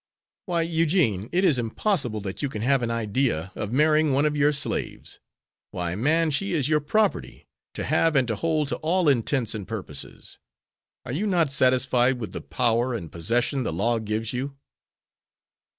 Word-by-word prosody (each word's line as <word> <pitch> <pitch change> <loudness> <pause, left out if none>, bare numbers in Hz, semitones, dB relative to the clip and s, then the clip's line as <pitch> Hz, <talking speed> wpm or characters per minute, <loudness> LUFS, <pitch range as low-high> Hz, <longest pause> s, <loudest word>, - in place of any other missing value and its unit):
"Why, 170 -2 +1
Eugene, 160 - +1
it 185 +2 +1
is 150 -9 +3
impossible 120 - -1
that 95 0 -5
you 140 - -1
can 110 -4 -5
have 135 +1 +3
an 120 - -1
idea 115 - -1
of 105 - -5
marrying 155 +2 +3
one 140 +3 +2
of 150 0 +1
your 145 0 +3
slaves. 140 -1 -4 0.5
Why, 85 -1 -3
man, 155 - +1
she 195 +6 -1
is 150 -6 +1
your 155 0 +3
property, 210 +8 -1 0.3
to - - -3
have 165 -2 +2
and 130 -3 +3
to 115 - -1
hold 155 +3 0
to - - -2
all 175 +2 +1
intents 125 -3 +1
and 105 -4 -6
purposes. 95 -10 -8 0.7
Are 125 - -5
you 185 +11 -1
not 170 -7 +2
satisfied 130 -1 +3
with 110 -4 -6
the - - -6
power 115 - 0
and 85 -8 -6
possession 120 - 0
the 120 - -2
law 115 +8 0
gives 110 +1 -3
you?" 135 +2 -4
130 Hz, 175 wpm, -25 LUFS, 110-155 Hz, 0.7 s, is